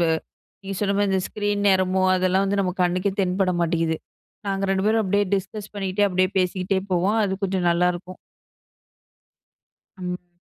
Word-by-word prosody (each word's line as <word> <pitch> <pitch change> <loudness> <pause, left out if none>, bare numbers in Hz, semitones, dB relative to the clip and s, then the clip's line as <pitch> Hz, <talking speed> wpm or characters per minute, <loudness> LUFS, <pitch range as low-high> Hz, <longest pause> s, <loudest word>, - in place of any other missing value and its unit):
வ 165 -1 +3 0.5
நீங்க 195 0 -4
சொன்ன 200 -1 +1
மாதிரி 205 -1 +2
இந்த 190 - +2
ஸ்க்ரீன் 205 -1 -1
நேரமோ, 185 0 +2
அதெல்லாம் 185 +1 +2
வந்து 200 0 +1
நம்ம 180 -2 0
கண்ணுக்கே 185 +2 +1
தென்பட 185 0 +1
மாட்டேங்குது. 165 -1 +1 0.5
நாங்க 195 0 -1
2 190 0 +1
பேரும் 220 +1 +3
அப்படியே 205 +2 +1
டிஸ்கஸ் 205 +2 -5
பண்ணிகிட்டே 200 0 0
அப்படியே 185 -1 +1
பேசிக்கிட்டே 185 +1 0
போவோம். 190 +5 +2
அது 190 -1 0
கொஞ்சம் 185 -2 0
நல்லாயிருக்கும். 180 +1 0 1.8
ம். 180 -1 -6
190 Hz, 150 wpm, -23 LUFS, 180-200 Hz, 1.8 s, வ